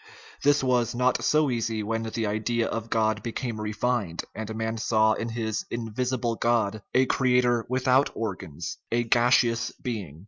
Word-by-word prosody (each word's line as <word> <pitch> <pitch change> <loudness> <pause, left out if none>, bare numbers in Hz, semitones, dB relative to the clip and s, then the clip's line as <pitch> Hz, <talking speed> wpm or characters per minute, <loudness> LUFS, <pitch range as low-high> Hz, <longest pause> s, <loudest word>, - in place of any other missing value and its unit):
This 145 -1 +3
was 120 -2 +1
not 125 +1 +1
so 150 -3 +3
easy 115 -2 -1
when 115 +2 -1
the 115 0 -3
idea 110 +3 0
of 115 0 -4
God 110 -2 +1
became 115 0 -4
refined, 105 -4 -1
and 110 0 -5
man 110 0 -2
saw 110 -1 +3
in 115 +2 -3
his 110 -2 -2
"invisible 120 +1 -2
God" 110 -3 +1
a 130 +1 +5
creator 125 -3 +2
without 130 +1 +3
organs 95 -8 -5
a 120 +1 +2
gas 120 +1 +4
eous 115 0 -1
being. 100 - -5
115 Hz, 160 wpm, -26 LUFS, 110-125 Hz, -, a